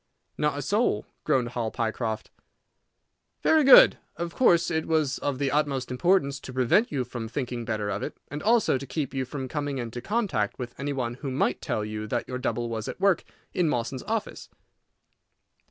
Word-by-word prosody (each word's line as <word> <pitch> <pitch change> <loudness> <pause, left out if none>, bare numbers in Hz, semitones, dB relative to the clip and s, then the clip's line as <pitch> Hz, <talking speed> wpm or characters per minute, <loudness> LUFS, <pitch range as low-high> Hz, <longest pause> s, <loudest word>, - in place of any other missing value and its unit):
"Not 150 -1 0
a 145 - -3
soul," 205 - +1 0.2
groaned 130 -5 +2
Hall 120 -2 -2
Pycroft. 110 -1 -3 1.1
"Very 315 -1 +5
good. 270 - +8 0.2
Of 170 0 -4
course 170 -10 +4
it 160 -1 -1
was 155 -4 +1
of 140 -2 -1
the 135 0 0
utmost 140 -3 0
importance 140 0 +2
to 135 - -9
prevent 130 - +3
you 135 -4 0
from 120 -2 -6
thinking 120 -1 -4
better 105 -3 -2
of 100 - -3
it, - - -5
and 145 +2 -6
also 220 - +3
to 135 - -8
keep 140 -2 -3
you 135 -1 -1
from 130 0 -5
coming 145 -1 -3
into 120 -1 -5
contact 175 - -1
with 120 -2 -6
any 140 +1 -2
one 125 -4 -2
who 140 - -3
might 130 +2 0
tell 105 - -2
you 110 0 -5
that 120 +2 -2
your 125 0 -4
double 120 -1 -1
was 110 -2 -4
at - - -6
work 195 -2 +3 0.3
in 175 -3 +2
Mawson's 125 0 -2
office. 220 -1 -3
135 Hz, 185 wpm, -27 LUFS, 120-155 Hz, 1.1 s, good